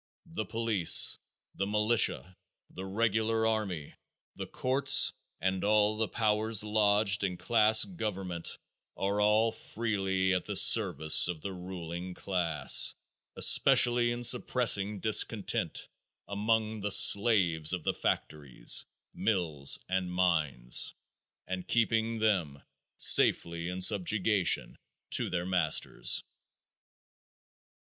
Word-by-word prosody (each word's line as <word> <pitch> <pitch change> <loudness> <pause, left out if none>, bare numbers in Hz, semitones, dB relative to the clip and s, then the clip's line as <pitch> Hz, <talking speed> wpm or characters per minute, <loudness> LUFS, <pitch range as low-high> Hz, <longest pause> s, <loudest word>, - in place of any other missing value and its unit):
The 165 -11 -7
police, 110 -4 +3 0.3
the 100 - -5
militia, 105 -3 0 0.4
the 95 - -9
regular 110 +2 -2
army, 100 -9 -4 0.4
the - - -8
courts 130 +2 +3 0.3
and 95 0 -3
all 105 0 +1
the 110 0 -2
powers 110 0 0
lodged 105 -1 0
in 90 -2 -3
class 110 0 +3
government 95 - -6 0.4
are 100 +1 -3
all 110 +2 +1
freely 95 -5 -3
at 90 - -3
the 105 - -6
service 90 -8 +4
of 85 -3 -6
the 100 +2 -7
ruling 90 -1 -9
class, 85 -7 +1 0.4
especially 120 -1 +4
in 120 0 -5
suppressing 115 -4 +1
discontent 110 0 0 0.4
among 110 +1 -3
the 105 - -4
slaves 95 -7 +4
of 90 -3 -4
the - - -2
factories, 70 -5 -2 0.3
mills 80 -10 -1
and 95 -1 -4
mines, 80 -9 0 0.5
and 95 0 -7
keeping 115 -1 -1
them 90 -11 -2 0.3
safely 85 0 +3
in 90 +1 -7
subjugation 100 0 +1 0.3
to - - -1
their 90 -1 -4
masters. 90 -4 0
100 Hz, 105 wpm, -28 LUFS, 90-110 Hz, 0.5 s, service